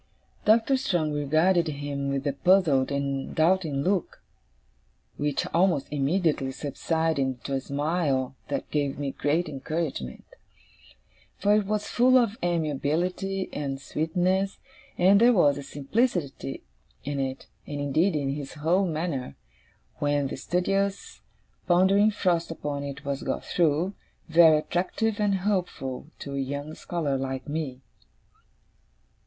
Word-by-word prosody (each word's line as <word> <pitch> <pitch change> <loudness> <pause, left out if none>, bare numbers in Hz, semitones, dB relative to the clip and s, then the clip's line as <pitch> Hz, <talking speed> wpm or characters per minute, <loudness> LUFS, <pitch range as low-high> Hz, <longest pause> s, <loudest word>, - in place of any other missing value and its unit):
Doctor 225 +5 +4
Strong 175 - 0
regarded 160 +5 +2
him 140 -2 -3
with 140 0 -2
a 140 - +1
puzzled 155 -6 +3
and 140 -1 -2
doubting 160 -4 +2
look, 185 0 -1 1.0
which 145 -1 -1
almost 170 -5 +2
immediately 150 -1 +1
subsided 160 +3 -1
into 130 0 -3
a 135 - 0
smile 140 -2 -1
that 145 - -4
gave 145 -2 0
me 140 -1 -2
great 155 +6 0
encouragement; 145 - -4 1.1
for 205 - +3
it 210 -2 +2
was 210 0 -1
full 255 +2 +4
of 230 -4 +2
amiability 175 +4 -1
and 135 -2 -3
sweetness, 180 +7 0 0.4
and 195 +3 +5
there 245 +1 +7
was 145 -9 +4
a - - -5
simplicity 145 - -2 0.4
in 140 0 -3
it, 135 0 -3 0.2
and 145 -1 -4
indeed 155 +6 +1
in 140 -2 -1
his 140 -1 -6
whole 170 +6 +2
manner, 155 - -3 0.6
when 145 -1 +1
the - - -4
studious, 195 +7 -1 0.5
pondering 190 +4 +5
frost 180 -5 0
upon 145 -3 -4
it 140 0 -7
was 140 0 -2
got - - -3
through, 170 +3 +1 0.3
very 160 -1 +7
attractive 190 +7 -1
and 205 -2 +2
hopeful 175 -10 -2
to 140 - -7
a 140 - -2
young 145 +3 -4
scholar 155 -6 -2
like 130 0 -4
me. 145 -4 -4
155 Hz, 130 wpm, -26 LUFS, 140-185 Hz, 1.1 s, there